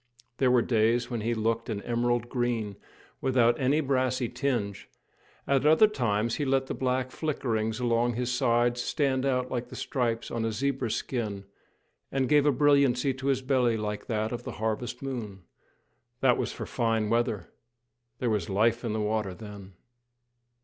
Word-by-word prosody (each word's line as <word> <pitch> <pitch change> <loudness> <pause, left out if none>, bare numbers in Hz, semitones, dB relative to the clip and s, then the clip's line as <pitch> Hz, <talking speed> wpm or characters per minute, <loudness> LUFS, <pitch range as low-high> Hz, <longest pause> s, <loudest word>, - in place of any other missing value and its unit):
There 130 - +4
were 125 -2 +4
days 115 +2 +2
when 120 -2 -2
he 115 +2 0
looked 115 +1 -1
an 100 -2 -3
emerald 120 0 0
green, 120 -5 -1 0.5
without 120 -3 +3
any 140 +4 +2
brassy 130 -3 0
tinge; 120 -8 -2 0.6
at 135 -1 +2
other 155 +8 +6
times 115 - 0
he 150 - -1
let 135 -1 +1
the - - -4
black 130 0 -1
flickerings 115 -8 -2
along 120 0 +1
his 125 +1 -1
sides 120 0 +2
stand 135 0 0
out 125 -1 0
like 120 -1 -2
the - - -9
stripes 115 -4 -2
on 115 -1 -2
a 115 - 0
zebra's 130 0 -1
skin, 105 -6 -3 0.7
and 135 -1 +1
gave 150 -1 +4
a - - +6
brilliancy 140 -2 +3
to 135 +1 -5
his 135 -1 +1
belly 125 -4 +2
like 105 -1 -4
that 110 -1 -1
of 120 - -4
the - - -6
harvest 110 +4 -3
moon. 110 -8 -5 0.8
That 125 -2 +5
was - - -1
for - - -6
fine 115 -3 0
weather. 115 -6 0 0.7
There 120 -2 0
was 105 -1 -1
life 115 +5 +2
in 115 -3 -2
the 110 - -1
water 105 -3 -1
then! 100 -3 -10
120 Hz, 170 wpm, -28 LUFS, 110-130 Hz, 0.8 s, other